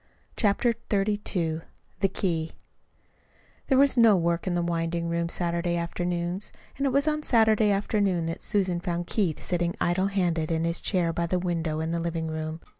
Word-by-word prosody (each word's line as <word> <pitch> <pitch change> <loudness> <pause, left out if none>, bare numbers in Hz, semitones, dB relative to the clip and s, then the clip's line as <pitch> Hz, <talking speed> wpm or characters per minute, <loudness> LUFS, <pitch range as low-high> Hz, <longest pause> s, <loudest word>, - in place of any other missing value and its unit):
CHAPTER 225 +2 +2 0.2
XXXII 195 -5 0 0.4
THE 195 - +3
KEY 165 -5 -1 1.1
There 265 - +3
was 275 -1 +5
no 230 -3 +7
work 170 0 0
at 180 - 0
the 175 - 0
winding 170 0 -1
room 170 0 -1
Saturday 170 0 -1
afternoons, 175 +2 -2 0.2
and 275 0 0
it - - +1
was 280 +3 +2
on 305 0 +1
Saturday 220 -5 +4
afternoon 200 -3 +1
that 165 0 -4
Susan 190 -4 0
found 175 0 -3
Keith 180 -5 0
sitting 175 -1 -1
idle 185 +3 +1
handed 175 -5 0
in 165 0 0
his 170 +1 0
chair 175 -4 +1
by 170 +1 -1
the 180 - 0
window 165 -3 -2
in 160 +1 -2
the 170 - -1
living 165 -1 -2
room. 155 +1 -4
175 Hz, 175 wpm, -26 LUFS, 170-200 Hz, 1.1 s, no